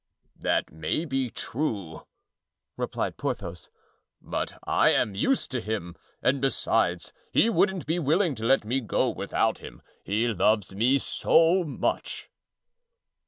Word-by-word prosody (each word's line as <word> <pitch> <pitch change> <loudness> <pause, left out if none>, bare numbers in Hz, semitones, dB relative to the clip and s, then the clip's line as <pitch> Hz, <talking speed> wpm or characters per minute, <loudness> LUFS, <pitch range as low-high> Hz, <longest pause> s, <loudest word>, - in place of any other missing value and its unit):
"That - - 0
may 80 - -2
be 135 -4 -1
true," 105 - -4 0.7
replied - - -3
Porthos; 85 0 -4 0.5
"but - - -4
I - - +3
am 105 - +2
used 250 - 0
to 125 -3 -2
him, 105 -6 -4 0.3
and 135 +1 +2
besides, 110 -9 0 0.2
he 230 - +4
wouldn't 190 -4 +1
be 165 +3 0
willing 160 +2 +2
to 110 - -8
let 130 -2 +3
me 125 +5 0
go 110 - +1
without - - 0
him, - - -11 0.2
he 110 +4 0
loves 105 -2 +1
me 120 +7 +3
so 165 +5 +3
much." 150 - -3
120 Hz, 130 wpm, -27 LUFS, 100-150 Hz, 0.7 s, he